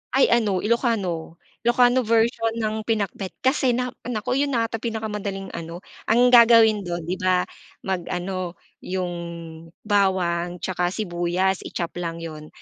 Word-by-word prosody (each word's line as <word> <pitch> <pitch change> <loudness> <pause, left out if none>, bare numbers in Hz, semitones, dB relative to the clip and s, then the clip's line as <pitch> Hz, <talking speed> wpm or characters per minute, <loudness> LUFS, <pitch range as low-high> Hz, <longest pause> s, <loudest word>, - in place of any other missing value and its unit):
Ay 270 - +4
ano 210 -6 +2
Ilokano, 205 -9 0 0.3
Ilokano 245 +1 +5
version 225 -1 +1
ng 220 -1 -2
pinakbet. 200 -4 -2
Kasi 260 -2 +2
na 250 0 -1 0.2
naku 245 +2 -1
'yun 280 -2 0
na 230 - +2
ata 225 0 -3
pinakamadaling 210 -4 -4
ano 170 +2 -7 0.2
ang 245 +3 +4
gagawin 230 -3 +7
dun 175 -1 -3
'di 180 +4 -3
ba 185 -1 +2 0.4
mag-ano 185 -1 -3 0.2
'yung 185 -1 -3 0.7
bawang 180 -4 +1
'tsaka 180 -1 0
sibuyas 180 -1 0
i-chop 170 -1 -4
lang 165 -1 -4
'yun, 155 -2 -8
200 Hz, 135 wpm, -23 LUFS, 180-230 Hz, 0.7 s, gagawin